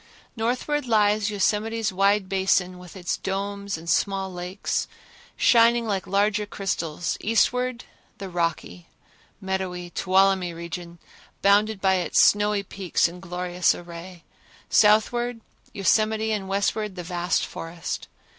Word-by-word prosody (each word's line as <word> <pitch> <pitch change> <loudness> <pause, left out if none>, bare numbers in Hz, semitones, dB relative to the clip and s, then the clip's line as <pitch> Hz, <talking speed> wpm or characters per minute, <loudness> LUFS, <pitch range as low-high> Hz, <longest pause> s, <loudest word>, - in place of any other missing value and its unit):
Northward 255 +5 -1
lies 210 -2 +3
Yosemite's 215 +1 0
wide 195 +1 +2
basin 190 -1 +1
with 180 -3 -12
its 180 -1 -2
domes 200 0 -3
and 165 +1 -12
small 190 +2 0
lakes, 180 +3 -3 0.5
shining 235 0 +5
like 195 -4 -2
larger 205 +2 +1
crystals; 175 -5 -3
eastward 245 +3 +1 0.3
the 195 - -6
rocky, 165 - -3 0.5
meadowy 185 -2 -4
Tuolumne 190 -2 +2
region, 170 0 -7 0.5
bounded 205 +1 +4
by 190 -1 +3
its 175 -3 +1
snowy 205 0 +4
peaks 190 -3 0
in 175 +2 -10
glorious 180 -1 0
array; 175 0 -10 0.5
southward 230 +3 +3 0.3
Yosemite 215 +3 +1
and 200 -3 -2
westward 200 +1 -1
the 180 - -6
vast 175 0 -1
forest. 165 0 -6
195 Hz, 115 wpm, -24 LUFS, 180-210 Hz, 0.5 s, shining